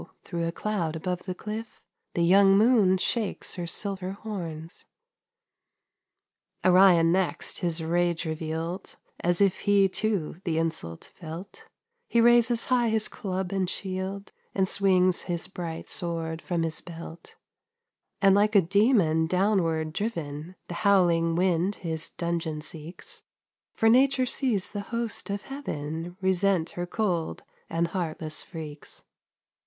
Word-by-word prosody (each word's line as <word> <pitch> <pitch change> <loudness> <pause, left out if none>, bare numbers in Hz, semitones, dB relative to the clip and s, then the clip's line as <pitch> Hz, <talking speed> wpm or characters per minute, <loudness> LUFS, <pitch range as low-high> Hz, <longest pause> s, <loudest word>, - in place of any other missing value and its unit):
through 170 -2 -3
a - - -1
cloud 170 -4 -2
above 180 +2 -3
the 185 - -3
cliff, 215 +3 -6 0.4
The 170 - +2
young 195 +2 +6
moon 210 -4 +5
shakes 215 +2 -1
her 175 -2 -4
silver 190 +1 -1
horns. 170 -6 -7 1.8
Orion 180 -3 +6
next 185 0 0
his 170 -3 -1
rage 175 +1 0
revealed, 160 +3 -4 0.2
As 175 +2 +1
if 195 -2 +3
he, 200 -1 +4
too, 190 -4 -2
the 165 -3 -1
insult 160 - -3
felt; 170 +4 -9 0.4
He 235 - +3
raises 235 0 +5
high 245 -3 +2
his 220 -1 0
club 190 -2 -4
and 190 -2 0
shield, 190 +1 -4 0.2
And 190 -1 +2
swings 185 -2 +3
his 170 0 -1
bright 170 -4 -6
sword 165 -1 -2
from 170 -2 -1
his 160 -1 -2
belt; 170 -1 -10 0.9
And 195 -1 +7
like 210 +2 +3
a 200 - +8
demon 185 -4 +3
downward 170 -4 +1
driven, 165 -5 -4
The - - -6
howling 175 -5 +3
wind 180 +2 +1
his 160 -3 -3
dungeon 165 -3 -3
seeks; 160 +3 -6 0.5
For 225 - +2
nature 260 +3 +4
sees 245 -7 0
the 205 - -4
hosts 230 -3 -3
of 200 +1 -3
heaven 165 - -5
Resent 190 -2 +2
her 175 0 -4
cold 175 -5 -1 0.3
and 170 0 0
heartless 160 -3 -3
freaks. 155 -3 -8
180 Hz, 130 wpm, -27 LUFS, 165-200 Hz, 1.8 s, a